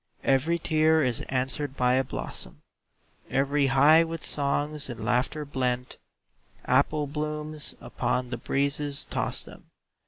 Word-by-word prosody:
Every 140 +6 +2
tear 160 -1 +3
is 125 -3 0
answered 135 +2 -1
by 125 0 +3
a 130 +1 +3
blossom, 130 - -7 0.7
Every 140 +1 +2
high 145 +5 +6
with 165 -1 -5
songs 145 0 -1
and 115 -3 -6
laughter 125 +6 0
blent, 125 -2 -2 0.7
Apple 145 +4 +2
blooms 150 +1 -2
upon 125 -1 -2
the - - -2
breezes 140 +1 -1
toss - - -2
them. - - -14
140 Hz, 125 wpm, -27 LUFS, 130-150 Hz, 0.7 s, high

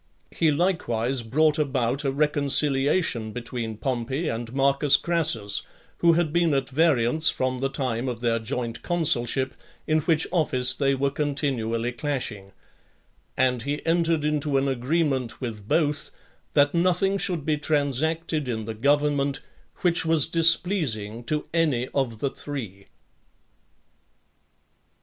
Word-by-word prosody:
He 160 - +1
likewise 135 -7 0
brought 150 +7 +2
about 135 -2 0
a 135 - 0
reconciliation 140 -3 +1
between 115 -2 -5
Pompey 130 +5 -2
and 115 0 -4
Marcus 140 +1 +3
Crassus, 155 -12 +1 0.4
who 170 -1 +5
had 160 -2 0
been 170 -4 +2
at 135 -1 -1
variance 155 0 +2
from 130 0 -2
(13) - - -9
the 135 - 0
time 130 -3 -2
of 120 -3 -5
their 115 -1 0
joint 115 0 -4
consulship, 135 -6 +1 0.3
in 155 0 +2
which 160 +1 +1
office 130 -8 +3
they 135 0 +1
were 140 +1 0
continually 130 -6 -2
clashing; 120 -7 -4 0.9
and 125 -2 +2
he 145 +4 -4
entered 165 -2 +1
into 150 -2 0
an 135 +1 +1
agreement 135 -1 -1
with 110 -5 -6
both, 150 0 0 0.5
that 145 0 +4
nothing 185 +3 +1
should 175 -6 -1
be 155 -1 +1
transacted 150 +1 -1
in 110 -3 -3
the 110 - -5
government, 140 +3 +1 0.4
which 175 -3 +2
was 160 -3 +3
displeasing 160 - +2
to 150 +4 -2
any 150 -7 +1
of 130 -5 -2
the 135 +4 -2
three. 110 -10 -7
140 Hz, 130 wpm, -25 LUFS, 120-155 Hz, 0.9 s, who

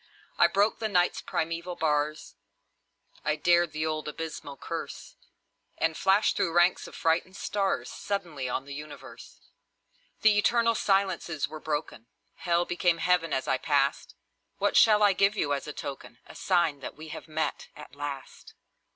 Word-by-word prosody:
I 170 - +7
broke 200 +5 +1
the 220 - -1
Night's 180 -3 +2
primeval 165 +2 -3
bars, 150 -1 -1 0.9
I 155 0 +1
dared 175 0 +3
the 155 0 -2
old 155 -1 -2
abysmal 150 -2 -6
curse, - - -6 0.6
And 160 0 +1
flashed 195 +5 +3
through 170 - 0
ranks 175 +1 +3
of - - -12
frightened 165 +3 0
stars 195 -2 -1
Suddenly 165 -10 -4
on 130 +2 -2
the 140 - -8
universe! 150 +1 -10 0.8
The 215 -2 +5
eternal 230 +2 +3
silences 195 -7 0
were 155 - -8
broken; 150 -7 -4 0.3
Hell 175 -1 +1
became 175 -1 +1
Heaven 175 -1 +1
as 130 - -1
I 130 - +1
passed. 140 -2 0 0.4
What - - 0
shall 210 -1 +6
I 205 -1 +6
give 200 +2 +3
you 145 -5 +1
as 140 - -3
a - - -4
token, 140 -5 -7
A - - -13
sign 170 -6 +1
that 135 - -7
we 155 +1 -9
have - - -8
met, 155 0 -2
at 150 -4 -12
last? 140 -2 -7
165 Hz, 160 wpm, -28 LUFS, 150-185 Hz, 0.9 s, I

